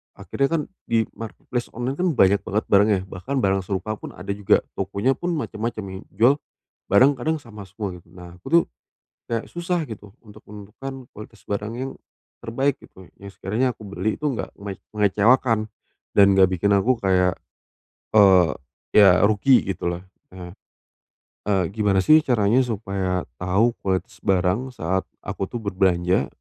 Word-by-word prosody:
akhirnya 140 Hz, -, -1 dB
kan 165 Hz, -2 st, +1 dB, 0.3 s
di 115 Hz, -1 st, +2 dB
marketplace 120 Hz, +2 st, -5 dB
online 125 Hz, +3 st, -3 dB
kan 185 Hz, -, +2 dB
banyak 100 Hz, -2 st, +4 dB
banget 105 Hz, +3 st, -1 dB
barang 100 Hz, +1 st, +6 dB
ya, 95 Hz, -, +2 dB
bahkan 100 Hz, +10 st, -5 dB
barang 95 Hz, 0 st, +2 dB
serupa 100 Hz, +3 st, -3 dB
pun -, -, -8 dB
ada 95 Hz, +2 st, -6 dB
juga, 100 Hz, -1 st, +3 dB, 0.2 s
tokonya 100 Hz, +7 st, 0 dB
pun 175 Hz, 0 st, -3 dB
macam-macam, 110 Hz, -6 st, -4 dB
yang 95 Hz, 0 st, -7 dB
jual 115 Hz, +8 st, +4 dB, 0.6 s
barang 130 Hz, +8 st, +6 dB
kadang 155 Hz, +5 st, -1 dB
sama 105 Hz, -7 st, -11 dB
semua, 95 Hz, 0 st, -6 dB
gitu. 85 Hz, -1 st, -17 dB
Nah, 90 Hz, -1 st, -12 dB
aku 90 Hz, -, -15 dB
tuh 170 Hz, 0 st, +6 dB, 0.7 s
kayak 115 Hz, -1 st, -2 dB
susah 175 Hz, -1 st, -2 dB
gitu 105 Hz, -3 st, -11 dB
untuk 105 Hz, -, -14 dB
menentukan 120 Hz, +6 st, -9 dB
kualitas 105 Hz, +1 st, -13 dB
barang 105 Hz, +3 st, -4 dB
yang 130 Hz, +2 st, -4 dB, 0.5 s
terbaik, 135 Hz, +4 st, -1 dB
gitu. 95 Hz, -1 st, -16 dB
Yang 100 Hz, -1 st, -11 dB
sekiranya 115 Hz, +5 st, -1 dB
aku 110 Hz, -, -13 dB
beli 100 Hz, +2 st, -2 dB
itu 150 Hz, -, -10 dB
nggak 120 Hz, -, -6 dB
menge 100 Hz, -2 st, -8 dB, 0.2 s
mengecewakan 110 Hz, +2 st, +3 dB, 0.5 s
dan 100 Hz, -, +8 dB
enggak 95 Hz, -1 st, +5 dB
bikin 95 Hz, +2 st, +1 dB
aku 110 Hz, +6 st, +3 dB
kayak, 90 Hz, -3 st, +2 dB, 0.8 s
eee, 95 Hz, -5 st, +6 dB, 0.4 s
ya 95 Hz, -3 st, +6 dB
rugi, 110 Hz, +5 st, +4 dB
gitu 90 Hz, -, -4 dB
loh, 85 Hz, +1 st, -3 dB, 0.3 s
eh. 90 Hz, -1 st, -9 dB, 1.0 s
Eee, 95 Hz, -3 st, +2 dB
gimana 100 Hz, -3 st, +1 dB
sih 155 Hz, +7 st, +7 dB
caranya 120 Hz, -4 st, +2 dB
supaya 95 Hz, -4 st, -2 dB, 0.2 s
tahu 100 Hz, +6 st, +2 dB
kualitas 95 Hz, -1 st, -2 dB
barang 95 Hz, +7 st, 0 dB
saat 95 Hz, -1 st, -2 dB, 0.2 s
aku 95 Hz, -, -4 dB
tuh 120 Hz, +3 st, -6 dB
berbelanja, 95 Hz, -2 st, +1 dB
105 Hz, 160 wpm, -23 LUFS, 95-120 Hz, 1.0 s, dan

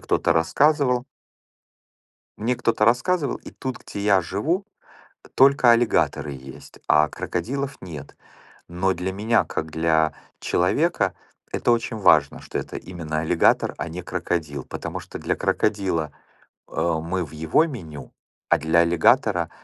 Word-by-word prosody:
кто-то 80 Hz, -, +1 dB
рассказывал 125 Hz, -, +2 dB, 1.3 s
мне 120 Hz, +3 st, -1 dB
кто-то 110 Hz, -2 st, +1 dB
рассказывал, 140 Hz, +7 st, +1 dB
и -, -, -12 dB
тут, 130 Hz, -3 st, -5 dB
где 100 Hz, -, -8 dB
я 100 Hz, -2 st, +4 dB
живу, 155 Hz, -, -1 dB, 0.7 s
только 135 Hz, -2 st, +5 dB
аллигаторы 115 Hz, -10 st, +1 dB
есть, 65 Hz, 0 st, -12 dB
а 75 Hz, 0 st, +4 dB
крокодилов 125 Hz, -, -4 dB
нет. 75 Hz, -6 st, -9 dB, 0.5 s
Но 90 Hz, +2 st, 0 dB
для 90 Hz, +2 st, -3 dB
меня, 110 Hz, +4 st, +1 dB
как 80 Hz, 0 st, -4 dB
для 80 Hz, -1 st, +2 dB, 0.3 s
человека, -, -, +1 dB, 0.4 s
это -, -, 0 dB
очень 115 Hz, -1 st, 0 dB
важно, 75 Hz, -8 st, +3 dB
что -, -, -5 dB
это -, -, -5 dB
именно 80 Hz, -4 st, -4 dB
аллигатор, 80 Hz, +1 st, +2 dB
а 85 Hz, -, -3 dB
не 85 Hz, +2 st, -6 dB
крокодил, 75 Hz, -6 st, -3 dB
потому -, -, -6 dB
что -, -, -9 dB
для -, -, -1 dB
крокодила, 95 Hz, -8 st, 0 dB, 0.6 s
э, -, -, -22 dB
мы 85 Hz, +2 st, -1 dB
в 75 Hz, -, -13 dB
его 80 Hz, -, +2 dB
меню, 80 Hz, -, -9 dB, 0.4 s
а -, -, +4 dB
для 80 Hz, +2 st, +2 dB
аллигатора- 85 Hz, -1 st, +3 dB
90 Hz, 135 wpm, -23 LUFS, 80-120 Hz, 1.3 s, только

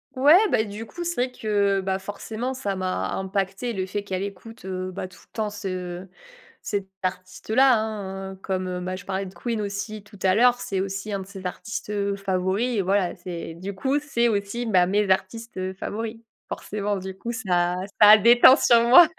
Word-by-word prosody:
Ouais, 290 Hz, +6 st, +7 dB
bah, 220 Hz, -, +3 dB
du 210 Hz, +2 st, -7 dB
coup, 345 Hz, +9 st, -7 dB
c'est 345 Hz, 0 st, -1 dB
vrai 250 Hz, +1 st, 0 dB
que, 200 Hz, -4 st, +1 dB
bah, 190 Hz, 0 st, -1 dB
forcément, 220 Hz, +6 st, -5 dB
ça 205 Hz, -7 st, -3 dB
m'a 185 Hz, 0 st, -2 dB
impacté 195 Hz, +4 st, -2 dB
le 190 Hz, -1 st, -3 dB
fait 205 Hz, +1 st, -3 dB
qu'elle 190 Hz, -2 st, -3 dB
écoute, 200 Hz, +3 st, -8 dB
heu, 185 Hz, 0 st, -4 dB
bah, 185 Hz, 0 st, -5 dB
tout 180 Hz, -, -17 dB
le -, -, -52 dB
temps 215 Hz, -2 st, -1 dB
ce 185 Hz, -3 st, -5 dB, 0.6 s
cet 200 Hz, -2 st, -2 dB, 0.2 s
artiste 185 Hz, +2 st, -5 dB
là, 260 Hz, 0 st, +6 dB
hein. 195 Hz, -3 st, -4 dB
Comme, 185 Hz, -1 st, -2 dB
heu, 180 Hz, 0 st, -3 dB
bah, 185 Hz, +1 st, -3 dB
je 195 Hz, -, -10 dB
parlais 195 Hz, 0 st, -2 dB
de 185 Hz, -, -10 dB
Queen 230 Hz, +4 st, -3 dB
aussi 205 Hz, +1 st, -4 dB
tout 205 Hz, -1 st, -16 dB
à 185 Hz, -1 st, +4 dB
l'heure, 245 Hz, +1 st, +5 dB
c'est 195 Hz, -1 st, -2 dB
aussi 195 Hz, +2 st, -4 dB
un 200 Hz, -, -1 dB
de -, -, -8 dB
ses 195 Hz, -2 st, -10 dB
artistes, 220 Hz, +3 st, -6 dB
heu, 200 Hz, -1 st, -1 dB
favoris. 195 Hz, +4 st, 0 dB
Voilà, 190 Hz, -1 st, +1 dB
c'est 170 Hz, -2 st, -7 dB
du 190 Hz, +3 st, -6 dB
coup, 270 Hz, +7 st, 0 dB
c'est 240 Hz, -5 st, +1 dB
aussi, 205 Hz, +3 st, -2 dB
bah, 180 Hz, -4 st, +4 dB
mes 205 Hz, 0 st, +1 dB
artistes, 210 Hz, +4 st, -1 dB
heu, 185 Hz, 0 st, -3 dB
favoris. 220 Hz, +4 st, -5 dB, 0.3 s
Forcément, 205 Hz, -1 st, -3 dB
du 190 Hz, 0 st, -7 dB
coup, 235 Hz, +4 st, -4 dB
ça 180 Hz, -6 st, 0 dB, 0.3 s
ça 210 Hz, -, +10 dB
a 215 Hz, -, +10 dB
déteint 240 Hz, +4 st, +8 dB
sur 235 Hz, -1 st, +5 dB
moi. 320 Hz, +7 st, +9 dB
200 Hz, 205 wpm, -24 LUFS, 190-225 Hz, 0.6 s, ça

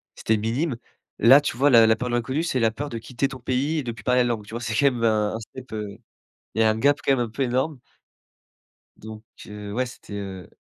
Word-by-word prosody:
c'était 110 Hz, -, 0 dB
minime. 120 Hz, +7 st, -1 dB, 0.4 s
Là, 130 Hz, +6 st, +8 dB
tu 145 Hz, -, -3 dB
vois, 140 Hz, +4 st, +3 dB
la 115 Hz, -4 st, +7 dB
la 110 Hz, -, +4 dB
peur 125 Hz, +2 st, -4 dB
de 120 Hz, -, 0 dB
l'inconnu, 130 Hz, +7 st, -1 dB
c'est 135 Hz, -7 st, -1 dB
la 115 Hz, -1 st, +3 dB
peur 145 Hz, +5 st, -5 dB
de 115 Hz, -, -5 dB
quitter 120 Hz, +4 st, -2 dB
ton 130 Hz, -2 st, -9 dB
pays 130 Hz, +6 st, -1 dB
et -, -, -3 dB
de 120 Hz, -, -3 dB
plus 105 Hz, -1 st, -13 dB
parler 125 Hz, 0 st, +3 dB
la -, -, 0 dB
langue. 110 Hz, -4 st, -2 dB
Tu 110 Hz, -, -12 dB
vois, 115 Hz, -, -3 dB
c'est 110 Hz, -1 st, -3 dB
quand 140 Hz, -, +2 dB
même 120 Hz, -2 st, -4 dB
un 105 Hz, -2 st, +2 dB
un -, -, -4 dB
step, 130 Hz, +3 st, -11 dB
heu. 105 Hz, -2 st, -5 dB, 0.6 s
Il 115 Hz, -, 0 dB
y -, -, +6 dB
un 110 Hz, 0 st, +3 dB
gap 140 Hz, +5 st, +3 dB
quand -, -, +2 dB
même 135 Hz, -, 0 dB
un 115 Hz, -, -9 dB
peu 125 Hz, -, -6 dB
énorme 130 Hz, +3 st, -1 dB, 1.2 s
donc 110 Hz, 0 st, -10 dB, 0.2 s
heu, 105 Hz, -1 st, -8 dB
ouais, 125 Hz, +4 st, 0 dB
c'était, 120 Hz, -4 st, -11 dB
heu, 95 Hz, -3 st, -7 dB
120 Hz, 260 wpm, -24 LUFS, 110-130 Hz, 1.2 s, Là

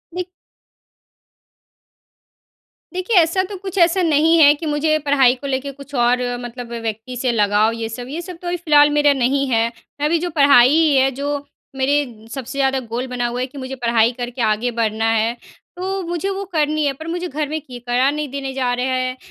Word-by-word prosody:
देख 360 Hz, -1 st, -3 dB, 2.7 s
देखिए, 370 Hz, +5 st, -1 dB
ऐसा 345 Hz, +2 st, +4 dB
तो 400 Hz, +2 st, -7 dB
कुछ 380 Hz, 0 st, -7 dB
ऐसा 345 Hz, +1 st, +4 dB
नहीं 325 Hz, 0 st, +3 dB
है 290 Hz, -2 st, +8 dB
कि 320 Hz, -, -7 dB
मुझे 310 Hz, +1 st, +1 dB
पढ़ाई 270 Hz, -3 st, +4 dB
को 280 Hz, +2 st, -8 dB
लेके 270 Hz, +1 st, -2 dB
कुछ 280 Hz, +1 st, -14 dB
और 245 Hz, 0 st, +2 dB, 0.2 s
मतलब 240 Hz, 0 st, -8 dB
व्यक्ति 225 Hz, +1 st, -5 dB
से 250 Hz, 0 st, 0 dB
लगाव, 210 Hz, 0 st, +2 dB
ये 230 Hz, -1 st, -4 dB
सब 245 Hz, +2 st, -7 dB
ये 315 Hz, +5 st, -4 dB
सब 360 Hz, 0 st, -9 dB
तो 355 Hz, -, -7 dB
अभी 350 Hz, 0 st, -1 dB
फिलहाल 295 Hz, -4 st, +5 dB
मेरा 295 Hz, -1 st, +3 dB
नहीं 270 Hz, +1 st, +1 dB
है। 225 Hz, -2 st, +2 dB, 0.4 s
मैं -, -, +2 dB
अभी 335 Hz, +2 st, +1 dB
जो 350 Hz, +2 st, -3 dB
पढ़ाई 280 Hz, 0 st, +6 dB
है, 270 Hz, -2 st, +4 dB
जो 285 Hz, +2 st, -4 dB, 0.3 s
मेरे 265 Hz, -5 st, -1 dB
सबसे 265 Hz, 0 st, -6 dB
ज़्यादा 270 Hz, -1 st, +2 dB
गोल 240 Hz, +1 st, -5 dB
बना 245 Hz, -1 st, -2 dB
हुआ 240 Hz, +1 st, -4 dB
है 255 Hz, -, -2 dB
कि 275 Hz, -, -14 dB
मुझे 265 Hz, 0 st, -6 dB
पढ़ाई 235 Hz, -2 st, +2 dB
करके 245 Hz, 0 st, -5 dB
आगे 220 Hz, +2 st, +1 dB
बढ़ना 225 Hz, -1 st, 0 dB
है। 225 Hz, +1 st, +1 dB, 0.4 s
तो 380 Hz, +2 st, -3 dB
मुझे 345 Hz, +2 st, -3 dB
वो 395 Hz, 0 st, -3 dB
करनी 305 Hz, -1 st, +1 dB
है, 280 Hz, -, +1 dB
पर 315 Hz, +4 st, -10 dB
मुझे 350 Hz, +2 st, -3 dB
घर 300 Hz, -1 st, -3 dB
में 310 Hz, +1 st, -2 dB
कि 255 Hz, -4 st, -10 dB
पढ़ा 250 Hz, +3 st, +2 dB
नहीं 300 Hz, 0 st, -4 dB
देने 270 Hz, 0 st, -5 dB
जा 255 Hz, -2 st, -1 dB
रहे 250 Hz, +1 st, -1 dB
हैं। 255 Hz, 0 st, -1 dB
270 Hz, 200 wpm, -19 LUFS, 245-310 Hz, 2.7 s, है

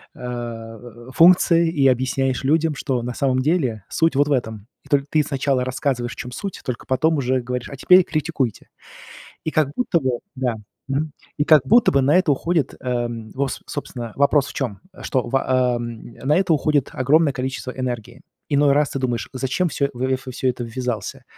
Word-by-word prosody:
а, 120 Hz, -1 st, -7 dB
функцией 170 Hz, +1 st, +5 dB
и 140 Hz, -5 st, +3 dB
объясняешь 130 Hz, +1 st, +1 dB
людям, 155 Hz, +2 st, +2 dB
что 130 Hz, -3 st, -2 dB
на 120 Hz, +1 st, -4 dB
самом 130 Hz, 0 st, +1 dB
деле 130 Hz, -, 0 dB
суть 165 Hz, -2 st, +1 dB
вот 145 Hz, +1 st, +3 dB
в 150 Hz, -, -2 dB
этом! 110 Hz, -5 st, -2 dB, 0.2 s
В -, -, -20 dB
только 140 Hz, -1 st, +2 dB
ты 155 Hz, 0 st, +2 dB
сначала 135 Hz, -2 st, 0 dB
рассказываешь, 130 Hz, -2 st, -2 dB
в -, -, -14 dB
чём 125 Hz, -, -7 dB
суть, 195 Hz, +8 st, -6 dB
только 125 Hz, -3 st, -5 dB
потом 155 Hz, +5 st, +1 dB
уже 130 Hz, -1 st, 0 dB
говоришь: 125 Hz, 0 st, -4 dB
"А 140 Hz, -, -7 dB
теперь 180 Hz, +7 st, +6 dB
критикуйте!" 155 Hz, -, -2 dB, 0.8 s
И 160 Hz, -, -1 dB
как 155 Hz, -3 st, +1 dB
будто 195 Hz, -9 st, +1 dB
бы, 130 Hz, -2 st, 0 dB, 0.2 s
да, 130 Hz, -3 st, -1 dB, 0.3 s
мгм, 145 Hz, +2 st, -1 dB, 0.2 s
и 145 Hz, -, +1 dB
как 155 Hz, -3 st, +6 dB
будто 235 Hz, -, +5 dB
бы, 140 Hz, -, +4 dB
на 145 Hz, +6 st, +3 dB
это 185 Hz, -5 st, +3 dB
уходит, 160 Hz, +1 st, 0 dB
э, 120 Hz, -2 st, -1 dB, 0.3 s
во 135 Hz, 0 st, 0 dB, 0.2 s
собственно, 120 Hz, -6 st, -6 dB
вопрос 140 Hz, 0 st, +3 dB
в -, -, -10 dB
чём? 120 Hz, -8 st, -3 dB, 0.2 s
Что 130 Hz, -2 st, 0 dB
в, 135 Hz, -, 0 dB
о, 130 Hz, -2 st, +1 dB
на 120 Hz, +5 st, -3 dB
это 180 Hz, -2 st, +2 dB
уходит 145 Hz, -1 st, +1 dB
огромное 150 Hz, +2 st, +3 dB
количество 130 Hz, 0 st, -4 dB
энергии. 125 Hz, -1 st, -5 dB, 0.3 s
Иной 145 Hz, -1 st, +4 dB
раз 145 Hz, 0 st, +2 dB
ты 135 Hz, -, -3 dB
думаешь: 120 Hz, -3 st, -2 dB
"Зачем 135 Hz, +7 st, -1 dB
всё, 140 Hz, +1 st, 0 dB
э, -, -, -7 dB
во 125 Hz, +1 st, -2 dB, 0.2 s
всё 130 Hz, +1 st, -1 dB
это 125 Hz, -1 st, -2 dB
ввязался?" 115 Hz, -3 st, -4 dB
130 Hz, 190 wpm, -21 LUFS, 125-150 Hz, 0.8 s, теперь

